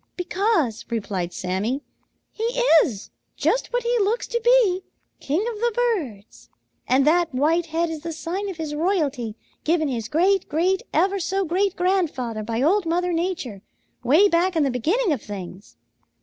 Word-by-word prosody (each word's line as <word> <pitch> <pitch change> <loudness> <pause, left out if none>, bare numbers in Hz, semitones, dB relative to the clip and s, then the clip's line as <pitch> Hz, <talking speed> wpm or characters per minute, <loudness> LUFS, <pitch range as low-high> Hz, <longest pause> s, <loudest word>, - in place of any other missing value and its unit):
"Because," 355 - 0
replied 195 -6 -3
Sammy, 200 +12 -2 0.5
"he 445 - -4 0.4
is 215 -7 -6 0.3
just - - 0
what - - 0
he 475 0 +1
looks 430 +4 +1
to 475 - -1
be, 470 -7 +4 0.4
king 320 +10 -1
of 465 -2 -4
the 475 +1 +1
birds, 320 - -2 0.4
and 265 +2 +3
that 335 +2 +3
white 320 +5 +2
head 330 +1 -1
is 315 -2 -6
the 335 +1 -5
sign 360 +5 -4
of 370 - -6
his 315 -2 -4
royalty 295 - -1 0.3
given 315 -1 +1
his 230 -4 -3
great 365 - +2
great 365 +5 +1
ever 385 +5 +2
so 385 +2 -1
great 375 +3 0
grandfather 315 - 0
by 225 +3 -2
Old 360 +4 +2
Mother 355 +2 0
Nature, 330 - -3 0.4
way 305 +12 +5
back 360 0 +1
in 315 - +3
the 275 - +1
beginning 345 - +1
of 275 -7 -1
things." 190 -1 -9
330 Hz, 165 wpm, -23 LUFS, 255-385 Hz, 0.5 s, way